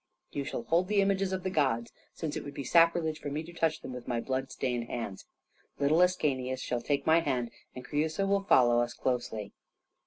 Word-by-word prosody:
You 140 - -3
shall 120 - -4
hold 170 +7 +2
the 210 0 +2
images 195 -1 +2
of 190 -1 -2
the 185 - -1
gods, 130 -8 +1 0.2
since 155 -3 -4
it - - -4
would 145 - -8
be 140 - -4
sacrilege 165 +1 +3
for 145 - -5
me 150 +3 -3
to 170 +2 -11
touch 165 -2 0
them 130 - -7
with 125 -1 -8
my 120 -2 0
blood 130 +2 -2
stained 125 -3 -2
hands. 115 -5 -5 0.5
Little 150 +4 +3
Ascanius 135 -8 +1
shall 120 -1 -2
take 140 +1 -1
my 160 +1 +5
hand, 130 -7 -1 0.2
and 125 0 -8
Creusa 155 +7 0
will 200 0 +2
follow 120 -11 +5
us 120 0 -2
closely." 120 -5 -2
145 Hz, 210 wpm, -30 LUFS, 125-170 Hz, 0.5 s, my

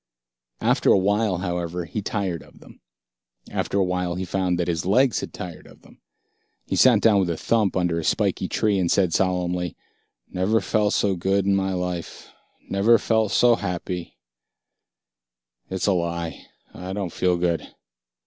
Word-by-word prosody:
After - - +2
awhile, 100 0 +2
however, 85 -1 -3
he 105 +6 -4
tired 95 -6 -2
of - - -18
them. - - -17 0.7
After - - -2
awhile 90 -2 0
he 95 +1 -3
found 90 -1 0
that 85 - -1
his 85 -1 -1
legs 120 +5 +3
had - - -6
tired 85 -3 -8
of - - -18
them. - - -20 0.6
He - - -2
sat 120 -5 +5
down 105 -3 +5
with 95 -2 +1
a 85 - -2
thump 105 -2 +1
under 85 -2 0
a - - -4
spiky - - 0
tree 105 -3 +1
and 90 -2 0
said 90 -4 +2
solemnly, 90 -2 0 0.5
"Never 100 +5 +1
felt 105 -2 +1
so 100 -2 +1
good 95 +2 0
in 100 - +3
my 95 0 0
life. 90 -2 -5 0.4
Never 105 +4 +4
felt 110 -2 +1
so 120 -1 +5
happy 90 -2 -5 1.5
it's 95 -1 -2
a 100 - +3
lie. 85 -2 -3 0.3
I 90 +1 -6
don't 95 -4 -4
feel 90 -1 +1
good." 85 -1 -1
95 Hz, 160 wpm, -23 LUFS, 90-100 Hz, 1.5 s, sat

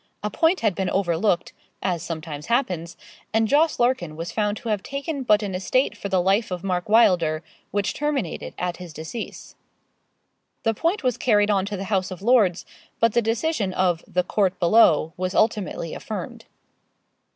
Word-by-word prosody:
A 210 - -2
point 330 - +2
had 215 -4 +2
been 190 0 -2
overlooked 175 0 0 0.3
as 175 -3 0
sometimes 160 -2 -6
happens 180 -9 -1 0.4
and 220 0 +3
Jos. 305 +6 +3
Larkin 240 -11 0
was 165 +2 -5
found 210 -1 0
to 235 - -6
have 210 -2 0
taken 280 +3 -4
but 210 -4 +3
an 200 -2 -3
estate 225 +8 0
for 200 - -6
the 190 -2 +2
life 200 +5 +2
of 180 -1 -5
Mark 180 0 -2
Wylder, 170 -8 +4 0.3
which 205 0 -1
terminated 285 - -3
at 180 -1 -2
his 180 -3 -9
decease. 160 +10 -7 1.1
The 225 - +2
point 335 - -1
was 250 -3 +1
carried 210 -3 +3
on 195 -1 +1
to 205 -1 -4
the 190 - -4
House 190 -1 +1
of 185 0 -8
Lords, 210 -7 +3 0.3
but 230 -2 +3
the 235 - +3
decision 225 - -1
of 180 -3 +1
'the 180 - 0
court 190 0 0
below' 170 -4 +4
was 185 +1 -2
ultimately 210 -6 0
affirmed. - - -6
200 Hz, 175 wpm, -24 LUFS, 180-230 Hz, 1.1 s, Wylder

